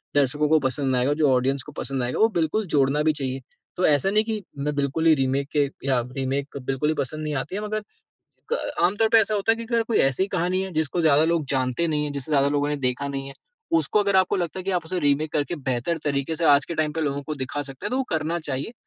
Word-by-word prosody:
दर्शकों 145 +2 +2
को 155 0 +5
पसंद 130 -1 0
आएगा, 125 +3 +2
जो 150 -1 +2
ऑडियंस 130 +2 +1
को 150 - -11
पसंद 135 -3 -3
आएगा, 120 - -2
वो 220 - +6
बिल्कुल 180 +2 0
जोड़ना 145 -1 +2
भी 155 0 +3
चाहिए। 135 -2 -4 0.4
तो 180 - +2
ऐसा 145 +4 +3
नहीं 215 +1 +4
कि 220 -1 -3 0.2
मैं 145 +1 -2
बिल्कुल 140 +3 -1
ही 160 - +7
रीमेक 135 0 0
के 145 -1 +4 0.2
या 130 -2 +3 0.2
रीमेक 135 +2 -2
बिल्कुल 135 +3 -1
ही 155 - +1
पसंद 155 +4 -2
नहीं 150 -1 -2
आती 135 +6 -3
है 205 - -2
मगर 215 0 -2 0.7
क - - +1 0.3
आम 180 +3 +3
तौर 220 +1 +2
पे 225 - +6
ऐसा 215 0 +1
होता 205 +2 +2
है - - +2
कि 230 - -6
अगर 230 0 0
कोई 225 0 0
ऐसी 135 +2 +2
ही - - -2
कहानी 180 0 0
है 190 - -6
जिसको 160 +2 0
ज़्यादा 155 -2 +4
लोग 165 -2 +1
जानते 130 +4 0
नहीं 150 -1 0
है, 145 - -3
जिसे 140 +1 -5
ज़्यादा 140 -1 +4
लोगों 145 0 0
ने 150 - 0
देखा 130 +1 -1
नहीं 135 -1 -4
है, 140 - -9 0.4
उसको 215 - +1
अगर 200 -1 +2
आपको 190 +1 +3
लगता 175 +1 -3
है - - -6
कि 195 - -2
आप 175 -3 -1
उसे 180 +2 -2
रीमेक 145 0 +1
करके 150 +4 -1
बेहतर 130 +3 -2
तरीके 140 +2 -1
से 165 - -1
आज 145 -1 +5
के 170 - -5
टाइम 155 -1 0
पे 160 - -2
लोगों 140 -2 -1
को 155 +2 -4
दिखा 135 +1 -4
सकते 135 -2 -8
हैं - - -2
तो 255 - 0
वो 265 - +1
करना 160 +2 -1
चाहिए। 145 - -4
150 Hz, 270 wpm, -24 LUFS, 140-175 Hz, 0.7 s, ही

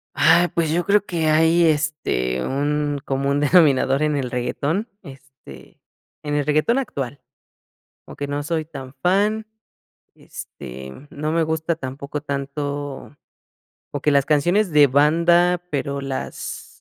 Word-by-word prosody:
Ay, 165 +5 +5
pues 165 -2 -1
yo 175 +1 0
creo 205 0 +3
que 165 -3 -1
hay, 160 +2 +4
este, 145 - 0
un 145 +1 -1
común 140 +1 0
denominador 145 -3 +4
en 150 -1 +1
el 130 -3 -2
reggaetón, 145 - -2 0.2
este, 135 - -14 0.4
en 145 0 -3
el 145 - 0
reggaetón 155 - +2
actual, 140 - -5 0.8
aunque 145 - -6
no 145 +1 -3
soy 160 0 -2
tan 135 -4 -9
fan, 210 +4 +1 0.7
este, 65 +1 -10 0.2
no 150 +2 -3
me 165 0 +2
gusta 160 +1 -1
tampoco 140 0 -6
tanto, 140 0 -5 0.8
o 145 - -4
que 150 - +2
las 140 -1 +3
canciones 175 +6 +2
de 145 -1 +6
banda, 170 +5 +3
pero 140 -1 -2
las 135 -1 -5
145 Hz, 130 wpm, -21 LUFS, 140-165 Hz, 0.8 s, de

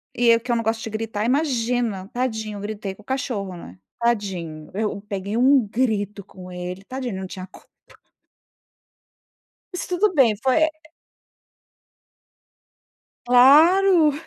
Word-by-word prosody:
E 245 - +1
eu 230 0 +6
que 245 +2 -5
eu - - +2
não 230 - -1
gosto 225 0 -1
de - - -5
gritar, 215 -1 -3
imagina, 245 -7 0
tadinho, 220 -4 -3
gritei 205 -2 -5
com - - -17
o - - -42
cachorro, 230 -8 -3
né. 95 - -12 0.2
Tadinho, 185 -10 -2
eu 210 -1 -2
peguei 200 +1 -4
um 260 -2 +4
grito 210 -3 -1
com 185 -1 -12
ele. 180 +2 -6
Tadinho, 255 +1 -5
ele 190 - -5
não 190 - -5
tinha 185 0 -8
culpa. - - -18 2.1
Mas 360 - -4
tudo 370 +2 +1
bem, 245 -9 +4
foi, 265 +4 +3
eh 315 - +3 2.6
Claro. 315 +7 +6
225 Hz, 140 wpm, -22 LUFS, 200-260 Hz, 2.6 s, eu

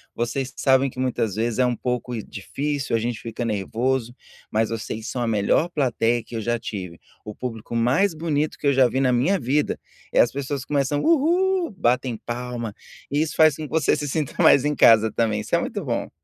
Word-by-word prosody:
"Vocês 120 +3 -2
sabem 135 0 +3
que 125 - -16
muitas 115 -6 -1
vezes 115 +2 -1
é 125 - +4
um 125 -1 0
pouco 125 0 -3
difícil, 140 +5 -3
a - - +2
gente 120 0 -3
fica 115 +1 -5
nervoso, 115 +4 -1 0.3
mas 110 +1 +1
vocês 110 0 -5
são 125 - -3
a 120 - 0
melhor 110 +10 +2
plateia 120 -6 0
que 115 - -10
eu 110 - -2
já 120 +2 0
tive, 95 -7 -7 0.2
o 105 - -8
público 115 -2 -6
mais 130 +11 +2
bonito 155 -2 -1
que - - -8
eu 140 - +4
já 130 -1 +5
vi 130 +3 -1
na 130 -2 +2
minha 160 +11 +2
vida", 140 +3 0 0.3
é - - +2
as 120 - +5
pessoas 140 0 -4
começam, 145 0 0
uhu, 345 +4 +2
batem 125 -2 +1
palma, 120 -2 -5 0.4
e 145 +2 +1
isso 160 - -2
faz 155 -3 +5
com 155 - -7
que - - -10
você 160 -2 +2
se 145 - -3
sinta 150 -1 -2
mais 140 - +6
em 150 - +1
casa 110 -4 +6
também, 110 -2 0
isso - - -1
é - - +3
muito - - -4
bom. - - -2
125 Hz, 210 wpm, -23 LUFS, 115-145 Hz, 0.4 s, mais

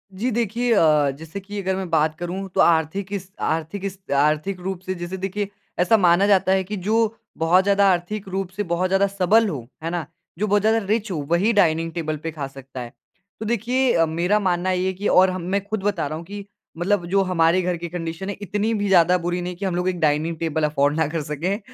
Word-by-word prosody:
जी 235 +7 -1
देखिए 235 +2 0
अ, 150 -6 +4
जैसे 160 +7 -8
कि 205 +1 -7
अगर 190 0 -1
मैं 190 -2 -4
बात 155 -1 +2
करूँ 185 +3 -4
तो - - +4
आर्थिक 170 +4 +2
इस 190 -1 -5
आर्थिक 165 +5 -2
इस 195 0 -5
अ - - +3
आर्थिक 155 +6 +1
रूप 190 0 -4
से 185 0 -3
जैसे 175 +2 -5
देखिए, 195 +2 -3 0.3
ऐसा 185 +6 +4
माना 185 +1 +4
जाता 190 -2 +3
है 190 0 +3
कि 210 +3 -5
जो 225 +1 +2 0.2
बहुत 175 +3 +4
ज़्यादा 200 0 +3
आर्थिक 190 +3 -2
रूप 190 -1 -3
से 205 +2 -4
बहुत 175 +1 -1
ज़्यादा 195 +1 +3
सबल 200 +3 +3
हो, 125 -8 -6 0.2
है 165 - -2
ना? 170 -3 -3 0.3
जो 210 - +1
बहुत 205 0 +3
ज़्यादा 220 +2 +3
रिच 215 0 -1
हो 165 - -2
वही 195 +7 +3
डाइनिंग 165 -4 +2
टेबल 155 -3 -3
पे 165 - -3
खा 145 -3 -5
सकता 135 -1 -10
है। 120 - -7 0.5
तो 220 - -5
देखिए 245 +3 +1
अ, 165 -1 +4
मेरा 175 +6 +1
मानना 185 -1 0
ये 185 0 0
है 190 - -1
कि 200 +3 -3
और 185 0 +5
ह 185 - -3
मैं 190 +3 -2
खुद 215 -1 -4
बता 195 -7 0
रहा 155 - -4
हूँ 165 - -9
कि 200 +2 -8 0.3
मतलब 180 0 0
जो 195 +1 +3
हमारे 175 -1 +2
घर 180 -1 -1
की 170 +1 -5
कंडीशन 165 +2 -5
है 200 - -3
इतनी 210 +3 -1
भी 205 -1 -1
ज़्यादा 180 -1 +5
बुरी 175 0 -2
नहीं 180 0 -4
कि 195 +2 -5
हम 185 - -1
लोग 180 +1 -1
एक 180 -2 -3
डाइनिंग 155 +2 +1
टेबल 160 -1 -2
अफोर्ड 145 -1 +2
ना 160 -2 +2
कर 160 0 -3
सकें। 165 +8 -2
185 Hz, 240 wpm, -22 LUFS, 165-200 Hz, 0.5 s, और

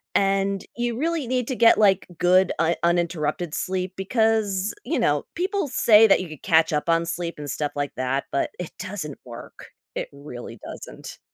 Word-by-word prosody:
and 195 0 +1
you 240 -1 -2
really 320 -2 -1
need 250 -1 -1
to 260 - -1
get, 230 -1 +6
like, 195 -3 +3
good 185 +1 +4
un 165 +1 +3
uninterrupted 170 -1 0
sleep 185 +1 -2
because, 210 -1 +1
you - - -1
know, - - +1
people 385 0 -1
say 225 -4 +6
that 195 - +5
you 180 - -5
could 155 -3 -10
catch 160 -1 +3
up 150 +3 -1
on 165 0 +3
sleep 170 0 -4
and 145 -1 -6
stuff 145 +2 -2
like 145 -1 -2
that, 130 +2 -1
but 140 - 0
it 180 - -5
doesn't 175 -7 -6
work. 120 -1 -11 0.3
It - - -3
really 125 -5 -9
doesn't. - - -9
180 Hz, 180 wpm, -24 LUFS, 155-220 Hz, 0.3 s, get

